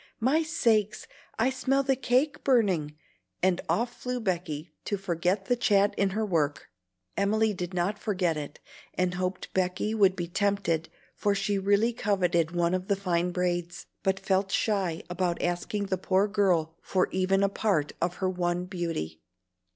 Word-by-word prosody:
My 265 +8 +3
sakes! 220 - +1 0.3
I 250 +4 +2
smell 270 +1 +1
the 270 0 +2
cake 265 +3 +1
burning!" 190 - +2 0.5
and 185 -1 +3
off 240 +2 -1
flew 250 0 -2
Becky 170 -6 -3
to 205 - -1
forget 185 +1 -1
the 245 - +2
chat 200 -3 +3
in 200 -1 +2
her 215 +3 -1
work. 155 -7 -1 0.4
Emily 215 +2 +2
did 180 -1 -5
not 190 +4 0
forget 185 -6 0
it, 145 -1 -6 0.4
and 185 -1 +1
hoped 185 +1 -3
Becky 185 +3 0
would 195 -4 +4
be 175 -2 -3
tempted, 185 -3 0 0.2
for 205 -1 0
she 200 0 0
really 205 +4 +2
coveted 180 -7 +1
one 170 0 0
of 185 0 -2
the 200 - +2
fine 180 -2 0
braids, 175 -1 -2 0.2
but 190 0 +1
felt 195 0 +1
shy 190 -6 0
about 180 -1 -1
asking 200 +4 -1
the 190 -2 -2
poor 190 +2 +2
girl 180 -6 +1
for 185 -1 +1
even 195 +1 +2
a - - +5
part 195 -7 0
of 175 +1 0
her 190 - -1
one 175 -1 -1
beauty. 165 - -4
190 Hz, 165 wpm, -28 LUFS, 175-210 Hz, 0.5 s, a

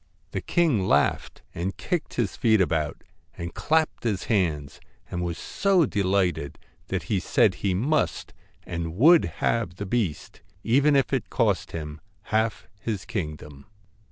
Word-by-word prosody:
The - - -3
king 145 - +2
laughed - - +1
and 90 +3 -3
kicked 175 -4 -3
his 115 -6 -1
feet 110 -3 +3
about, 80 -5 0 0.3
and 85 0 -5
clapped 160 0 0
his 105 -6 -1
hands, 80 - -1 0.3
and 90 - -2
was 85 -1 -3
so 190 -4 +2
delighted 95 - 0 0.3
that - - -2
he - - 0
said - - +3
he 95 -2 -1
must 145 +10 0 0.3
and 85 -1 -4
would 160 - +6 0.2
have 110 -8 0
the 100 - -5
beast, 100 -7 -2 0.2
even 140 +5 +4
if 135 -2 +2
it - - -1
cost - - +1
him 75 -2 -6 0.3
half 110 +1 +1
his 105 +1 -4
kingdom. 75 - -6
100 Hz, 145 wpm, -25 LUFS, 85-120 Hz, 0.3 s, would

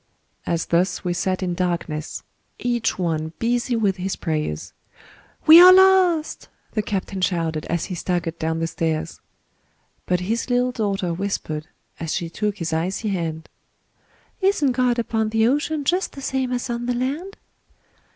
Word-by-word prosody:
As 170 -1 0
thus 175 +1 +1
we 180 -1 -1
sat 185 +2 -1
in 180 -1 -1
darkness 170 -3 -3 0.3
Each 240 -2 -1
one 160 -3 -2
busy 240 +1 0
with 200 -4 +1
his 185 +1 -2
prayers, 150 - -3 0.7
"We 325 +2 +10
are 365 +1 +11
lost!" 370 -4 +4 0.2
the 215 - 0
captain 195 -2 -3
shouted, 165 -4 -1
As 170 -1 -1
he 190 - -6
staggered 175 -1 -2
down 160 0 -1
the 165 - -1
stairs. 160 -1 -3 0.9
But 180 0 +1
his 225 +7 -2
little 250 0 +2
daughter 200 -7 -1
whispered, 165 -5 -3 0.3
As 165 -1 -2
she 170 -2 -3
took 210 +2 -2
his 170 -3 -3
icy 185 +7 -1
hand, 165 -4 -3 0.9
"Isn't 375 -8 +2
God 250 -1 +1
upon 225 -2 0
the 220 0 +2
ocean, 295 +3 0
Just 360 +6 0
the 275 - -9
same 265 -2 -1
as 245 0 -2
on 240 0 -3
the 245 - 0
land?" 290 +11 -3
195 Hz, 155 wpm, -22 LUFS, 170-245 Hz, 0.9 s, are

